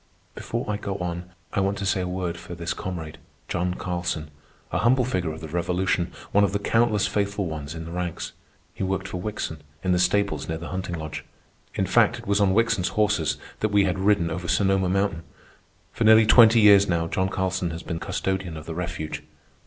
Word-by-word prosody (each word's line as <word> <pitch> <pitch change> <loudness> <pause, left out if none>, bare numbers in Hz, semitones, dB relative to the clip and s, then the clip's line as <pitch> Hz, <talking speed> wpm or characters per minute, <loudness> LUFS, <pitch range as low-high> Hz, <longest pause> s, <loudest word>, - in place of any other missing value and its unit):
Before 115 +2 -4
I 105 -1 -1
go 100 -1 -4
on 90 -1 -4 0.2
I - - +1
want 100 +1 +1
to 100 - -3
say 95 -1 +1
a 90 - -2
word 90 -1 -2
for 90 - -9
this 85 0 -3
comrade, 85 -6 -6 0.3
John 90 +1 -1
Carlson, 85 -3 -3 0.4
a - - 0
humble 125 +2 +3
figure 90 -9 -1
of 80 +1 -8
the 80 - -6
Revolution, 90 +2 0 0.2
one 100 - +4
of 100 - +1
the - - +2
countless 110 0 +2
faithful 100 -1 -1
ones 80 -2 -5
in 80 0 -6
the 85 - -8
ranks. 90 -1 -4 0.4
He - - -9
worked 95 0 -1
for 90 - -5
Wickson, 90 -7 -4 0.2
in 95 - +1
the 90 - +3
stables 100 +2 +1
near 80 - -1
the 85 +1 -7
hunting 95 -2 -3
lodge. 80 0 -6 0.5
In - - +1
fact, - - +3
it - - -11
was 100 +1 +2
on 95 -1 +3
Wickson's 115 -5 +2
horses 105 -7 +2 0.2
that 110 - +1
we 100 -1 +4
had 95 -1 0
ridden 95 -4 +2
over 90 +2 -4
Sonoma 95 -1 +2
Mountain. 95 -2 0 0.7
For - - -1
nearly 110 0 +7
twenty 115 +1 +7
years 100 -1 +7
now 85 -1 +1
John 95 +3 0
Carlson 95 -1 -1
has 85 +1 -6
been 80 -2 -4
custodian 95 -3 -2
of 80 - -9
the 80 - -5
refuge. 85 -2 -4
95 Hz, 205 wpm, -25 LUFS, 85-100 Hz, 0.7 s, nearly